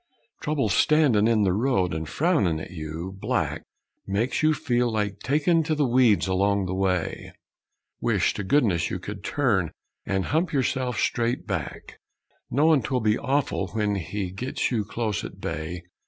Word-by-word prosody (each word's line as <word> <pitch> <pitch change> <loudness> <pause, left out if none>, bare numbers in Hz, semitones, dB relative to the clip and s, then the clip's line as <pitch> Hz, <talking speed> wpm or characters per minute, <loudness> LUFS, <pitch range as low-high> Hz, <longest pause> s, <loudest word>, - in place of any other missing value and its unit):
Trouble 150 -2 0
standin' 140 -9 +4
in 110 -2 +3
th' 95 - +2
road 100 -6 +1
and 80 0 -3
frownin' 150 - +1
at - - -8
you, 80 +3 -6
black, - - -1 0.5
Makes 105 +6 0
you 155 0 +4
feel 120 -3 0
like 105 -2 -2
takin' 155 +5 +2
to 155 -1 0
the 150 -1 +2
weeds 120 -4 +4
along 100 +1 +1
the 90 - -3
way; 95 -2 -1 0.7
Wish - - +1
to 105 - -4
goodness 100 - +2
you - - -2
could 100 +2 -8
turn 105 - +1 0.3
and 95 -1 -1
hump 160 +4 0
yerself 130 -2 0
straight 120 +1 0
back; - - -5 0.5
Know 155 +5 +4
'twill 130 -1 -1
be 110 0 +2
awful 135 -7 0
when 105 -2 0
he 95 0 -3
gets 125 +9 -2
you 115 -4 0
close 110 -1 -2
at - - -8
bay! 80 +3 -4
110 Hz, 160 wpm, -25 LUFS, 95-135 Hz, 0.7 s, standin